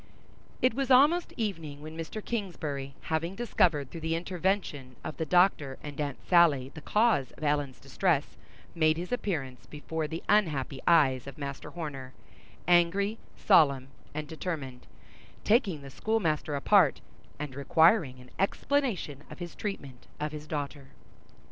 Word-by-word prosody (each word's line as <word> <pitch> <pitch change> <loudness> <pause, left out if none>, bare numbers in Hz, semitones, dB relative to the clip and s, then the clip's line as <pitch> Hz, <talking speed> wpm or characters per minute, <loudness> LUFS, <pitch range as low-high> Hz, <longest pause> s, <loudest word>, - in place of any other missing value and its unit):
It 255 - +4
was 270 +1 -2
almost 295 +7 +5
evening 165 - -3
when 155 +2 -9
Mr. 165 +6 -6
Kingsbury, 150 -11 -4
having 165 +3 -2
discovered, 170 - +1
through 165 - -7
the 160 +1 -1
intervention 175 -7 -2
of - - -6
the 160 - -2
Doctor 175 -7 +3
and 145 0 -5
Aunt 140 -3 -3
Sally 155 -7 +4
the 160 - -9
cause 210 - +2
of - - -12
Ellen's 145 -3 0
distress, 145 +2 0 0.4
made 155 -1 +3
his 175 +5 -5
appearance 150 - -3
before 155 +1 -4
the 165 +2 -6
unhappy 150 -10 +1
eyes 140 -7 +4
of 140 - -9
Master 140 -2 -6
Horner, 140 -6 -6 0.5
angry, 180 +5 +3 0.2
solemn 140 -9 +4 0.2
and 150 0 -5
determined; 150 -6 -5 0.6
taking 200 - +2
the 135 - -10
schoolmaster 160 -7 -1
apart, 165 +1 +4 0.4
and 150 -2 -5
requiring, 145 - +3
an 125 0 -15
explanation 195 - -1
of - - -10
his 175 -1 -7
treatment 140 - -6
of 150 0 -2
his 150 0 -8
daughter. 145 -2 -5
155 Hz, 140 wpm, -29 LUFS, 140-190 Hz, 0.6 s, almost